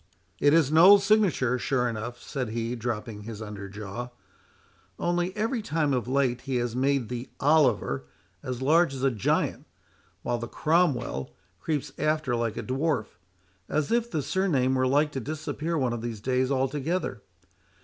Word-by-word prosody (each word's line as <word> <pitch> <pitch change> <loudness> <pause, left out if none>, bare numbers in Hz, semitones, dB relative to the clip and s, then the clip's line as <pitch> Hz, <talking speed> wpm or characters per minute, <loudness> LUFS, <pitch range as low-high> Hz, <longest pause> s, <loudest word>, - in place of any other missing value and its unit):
—"It 145 - +4
is 155 -3 +4
Noll's 190 +6 +8
signature 190 - +2
sure 125 -1 +1
enough," 120 +1 -5
said 130 -4 -4
he, 115 +2 -2
dropping 115 -2 -4
his 110 0 -7
under 105 -2 -7
jaw; 105 +4 -6 0.9
"only, 175 +1 0
every 225 +3 0
time 155 -8 0
of 125 -2 -1
late 130 -2 +1
he 135 -1 -3
has 120 -1 -1
made 135 -1 +1
the 125 +1 -5
Oliver 130 - +2 0.4
as 130 0 -4
large 155 0 +4
as 130 - -5
a 135 - +3
giant, 110 -5 0 0.6
while 120 -1 -1
the 115 - -5
Cromwell 125 - 0 0.2
creeps 150 - -2
after 155 -4 +1
like 115 -2 -2
a - - -3
dwarf, 130 - -2 0.5
as 150 -1 0
if 235 0 +1
the 155 -7 -2
surname 140 -5 +1
were 130 0 +2
like 145 +3 +2
to 135 - -3
disappear 155 +4 -3
one 130 -4 0
of 120 - -4
these 115 -2 -5
days 130 +3 0
altogether. 140 +6 -1
130 Hz, 160 wpm, -27 LUFS, 120-155 Hz, 0.9 s, Noll's